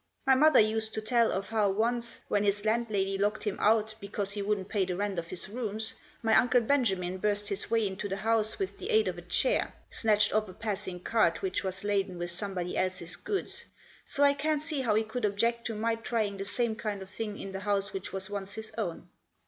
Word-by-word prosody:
My 265 - +6
mother 305 +4 +6
used 220 0 +2
to 220 - -1
tell 230 +1 +3
of 195 +1 -2
how 215 -2 +2
once, 235 +4 -1
when 205 - +2
his 205 +1 +1
landlady 215 -4 +1
locked 210 +1 +1
him 210 -2 -2
out 220 0 +3
because 200 0 -2
he 205 0 -2
wouldn't 200 -2 -1
pay 205 -3 +1
the 180 -1 -2
rent 200 -1 -1
of 165 - -6
his 185 +2 -5
rooms, 220 0 -3 0.3
my 220 -1 +4
Uncle 245 0 +5
Benjamin 195 -8 +1
burst 205 +1 0
his 200 -1 -2
way 225 -1 +2
into 195 +1 -3
the 195 - -1
house 220 0 +1
with 390 - -3
the - - -5
aid 440 -1 +4
of - - -2
a - - -8
chair, - - +1 0.2
snatched 215 -2 +3
off 215 -2 +1
a - - -9
passing 200 -4 -4
cart 200 -5 +2
which 190 -1 -1
was 190 +1 -3
laden 195 -3 0
with 175 0 -3
somebody 180 -1 -3
else's 185 -2 -1
goods, 400 -1 -4 0.4
so 285 - 0
I 280 0 +6
can't 300 +1 0
see 305 -3 -1
how 225 -5 +2
he 220 - +3
could 220 +3 -5
object 230 +3 +1
to 225 - -4
my 225 +2 +1
trying 225 -3 -1
the 195 - -4
same 225 +2 0
kind 210 -3 -3
of 190 - -13
thing 210 -1 -4
in 195 - -6
the 195 - -4
house 200 0 0
which 190 - -5
was 190 0 -5
once 200 -1 -4
his 220 0 -7
own. 175 -7 -3
210 Hz, 230 wpm, -30 LUFS, 195-225 Hz, 0.4 s, My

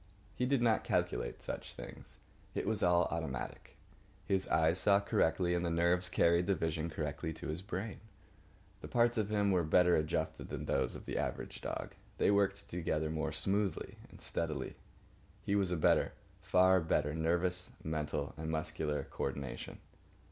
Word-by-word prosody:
He 125 - 0
did 135 -2 +2
not 110 -3 +3
calculate - - -1
such - - -5
things. - - -9 0.4
It - - -1
was 110 0 0
all 90 0 +5
automatic. 80 -6 -4 0.5
His 95 -1 +1
eyes 80 +3 +3
saw 100 -1 +5
correctly, 90 -3 +2
and 90 0 0
the 85 - 0
nerves 85 +2 +2
carried 85 0 +3
the 100 - +3
vision 80 -1 -1
correctly 75 0 -3
to 80 - -7
his 80 +3 -3
brain. 95 +2 -4 0.8
The - - -6
parts 120 -1 +3
of 105 -1 0
him 105 -1 +2
were 90 -2 +3
better 90 +2 +5
adjusted 75 0 -1
than - - -4
those - - 0
of - - -9
the - - -2
average - - -3
dog. - - -4 0.2
They - - +4
worked 100 -1 +1
together 80 -3 -1
more 80 0 -1
smoothly 100 +4 -1
and - - -14
steadily. 75 -5 -3 0.7
His 100 - +1
was 95 -3 +1
a 90 - +1
better, 75 - +3 0.3
far 95 +1 +5
better, 75 -2 +1
nervous, 85 +3 0
mental, 75 -2 -2
and 80 0 -4
muscular 80 -1 -1
co - - -4
ordination. 70 -1 -5
85 Hz, 165 wpm, -34 LUFS, 80-95 Hz, 0.8 s, all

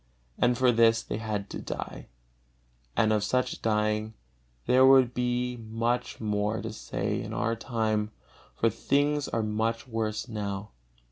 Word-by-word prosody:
And 125 0 +3
for 130 -1 +4
this 115 -1 +4
they - - -4
had 105 -2 -3
to - - -5
die, - - -6 0.9
and 110 -1 +4
of 105 -1 +1
such 125 +4 0
dying 110 0 0 0.5
there 130 +1 +5
would 130 -2 +6
be 125 0 -1
much 115 +2 -2
more 105 0 0
to 115 -1 -5
say - - -3
in - - -6
our 115 +1 0
time, 110 -3 -1 0.5
for 115 - +2
things 145 +5 +1
are 115 - -1
much 110 +3 -1
worse 110 -1 -2
now. 105 -2 -4
115 Hz, 145 wpm, -28 LUFS, 105-125 Hz, 0.9 s, would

